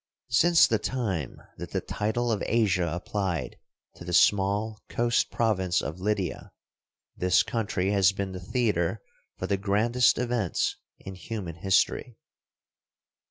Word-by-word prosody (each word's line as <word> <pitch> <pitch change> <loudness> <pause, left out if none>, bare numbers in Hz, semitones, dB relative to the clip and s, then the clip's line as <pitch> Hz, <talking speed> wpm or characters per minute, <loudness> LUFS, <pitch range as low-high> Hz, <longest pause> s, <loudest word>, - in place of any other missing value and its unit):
Since 170 0 +6
the 110 - +1
time 100 - -3 0.2
that - - -7
the - - +1
title 115 +3 -2
of 105 - -1
Asia 100 -7 +2
applied 90 - -3 0.4
to - - -10
the 90 0 -5
small 105 +3 +2
coast 120 0 +1
province 95 -6 +1
of 80 +5 -5
Lydia, 95 -3 -2 0.6
this 90 0 +3
country 100 -4 -1
has 100 -2 +4
been 100 0 -4
the 90 - -6
theater 115 - -1 0.3
for - - -4
the 100 - 0
grandest 110 +5 +2
events 120 -7 -1 0.2
in 95 - -9
human 95 -3 -6
history. 95 +6 +1
100 Hz, 130 wpm, -27 LUFS, 90-115 Hz, 0.6 s, Since